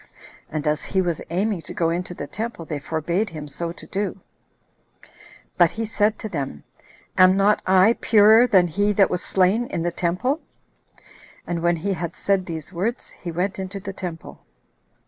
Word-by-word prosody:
And 155 Hz, 0 st, -4 dB
as 150 Hz, 0 st, +1 dB
he 190 Hz, -, -1 dB
was 175 Hz, -4 st, 0 dB
aiming 190 Hz, +2 st, 0 dB
to -, -, -8 dB
go 165 Hz, -1 st, +1 dB
into 175 Hz, +1 st, -3 dB
the -, -, -5 dB
temple, 225 Hz, -6 st, -5 dB
they 150 Hz, -2 st, -4 dB
forbade 170 Hz, +8 st, -1 dB
him 155 Hz, -3 st, -7 dB
so 165 Hz, +4 st, -4 dB
to -, -, -11 dB
do; 195 Hz, -1 st, -3 dB, 1.4 s
but 175 Hz, -2 st, +7 dB
he 225 Hz, 0 st, -4 dB
said 215 Hz, 0 st, +1 dB
to -, -, -5 dB
them, 140 Hz, -, -5 dB, 0.6 s
"Am 185 Hz, +1 st, +7 dB
not 205 Hz, +2 st, +3 dB
I 190 Hz, +4 st, +6 dB
purer 220 Hz, +2 st, +6 dB
than 190 Hz, -6 st, +4 dB
he 205 Hz, +5 st, +1 dB
that 200 Hz, -1 st, +4 dB
was 180 Hz, -, -1 dB
slain 195 Hz, +6 st, +2 dB
in 165 Hz, -, -3 dB
the 175 Hz, -, 0 dB
temple?" 185 Hz, -, -1 dB, 1.0 s
And 170 Hz, -1 st, -3 dB
when 175 Hz, 0 st, +2 dB
he 195 Hz, +5 st, -2 dB
had 170 Hz, -2 st, -4 dB
said 195 Hz, -2 st, 0 dB
these 160 Hz, +1 st, -6 dB
words, 215 Hz, +8 st, -3 dB
he 175 Hz, -, -7 dB
went 185 Hz, +4 st, -2 dB
into 190 Hz, +1 st, -5 dB
the 195 Hz, 0 st, -6 dB
temple. 175 Hz, -4 st, -8 dB
185 Hz, 180 wpm, -23 LUFS, 170-205 Hz, 1.4 s, but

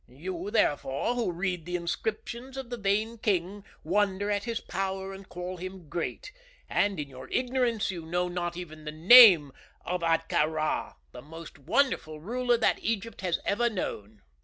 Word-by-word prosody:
You, 175 Hz, +8 st, -6 dB
therefore, 145 Hz, -, +1 dB
who 235 Hz, -6 st, -1 dB
read 175 Hz, -1 st, -3 dB
the 180 Hz, -, -3 dB
inscriptions 225 Hz, +8 st, -4 dB
of 260 Hz, -2 st, -6 dB
the 245 Hz, -, -3 dB
vain 215 Hz, +2 st, 0 dB
king 195 Hz, 0 st, -1 dB, 0.2 s
wonder 200 Hz, +3 st, +1 dB
at 205 Hz, 0 st, -1 dB
his 230 Hz, -1 st, -2 dB
power 190 Hz, 0 st, -4 dB
and 195 Hz, 0 st, -11 dB
call 180 Hz, +1 st, -6 dB
him 185 Hz, -2 st, -8 dB
great; 175 Hz, -, -4 dB, 0.4 s
and, 200 Hz, -4 st, +1 dB
in 145 Hz, -, -3 dB
your 130 Hz, -1 st, -11 dB
ignorance, 245 Hz, -4 st, 0 dB
you 175 Hz, -3 st, -6 dB
know 175 Hz, +2 st, -1 dB
not 175 Hz, -1 st, -3 dB
even 155 Hz, -3 st, -8 dB
the 150 Hz, -, -4 dB
name 175 Hz, -, +8 dB, 0.3 s
of 180 Hz, 0 st, -2 dB
Ahtka 165 Hz, -2 st, +2 dB
Rā, 155 Hz, -1 st, -2 dB, 0.2 s
the -, -, -10 dB
most 165 Hz, +1 st, -11 dB
wonderful 170 Hz, -, 0 dB
ruler 240 Hz, +7 st, 0 dB
that 225 Hz, -, +2 dB
Egypt 230 Hz, -1 st, -3 dB
has 180 Hz, -3 st, 0 dB
ever 235 Hz, +4 st, +2 dB
known." 110 Hz, -, -5 dB
185 Hz, 165 wpm, -28 LUFS, 165-220 Hz, 0.4 s, name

